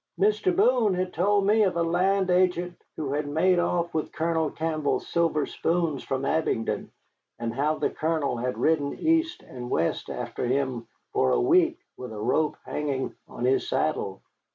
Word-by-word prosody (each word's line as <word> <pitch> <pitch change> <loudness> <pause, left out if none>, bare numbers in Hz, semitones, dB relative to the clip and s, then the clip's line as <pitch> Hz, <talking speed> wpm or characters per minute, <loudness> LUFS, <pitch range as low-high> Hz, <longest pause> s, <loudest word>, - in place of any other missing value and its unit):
"Mr. 205 -3 +2
Boone 225 -2 +3
had 180 0 -2
told 200 +3 +2
me 215 +2 +4
of 185 -4 +2
a 170 - +2
land 185 +3 +2
agent 180 -1 +2 0.2
who 145 -3 -3
had 150 0 -1
made 175 +5 +3
off 175 -1 0
with 155 - -2
Colonel 160 0 0
Campbell's 155 -2 -1
silver 165 -3 +1
spoons 165 -4 -1
from 135 0 -2
Abingdon, 140 -7 -1 0.5
and 115 -1 -3
how 145 +5 +1
the - - -1
Colonel 155 -5 -1
had 125 +2 -2
ridden 150 -3 +1
east 325 +2 +1
and 125 -1 -8
west 85 - -1
after - - -4
him 130 -3 -1 0.3
for 130 - +2
a - - +3
week 345 -2 +3 0.2
with 125 -2 -7
a 110 - -7
rope 130 +8 +1
hanging 140 -3 -2
on 120 - -4
his 130 +1 +2
saddle. 125 -11 -1
160 Hz, 170 wpm, -26 LUFS, 140-185 Hz, 0.5 s, me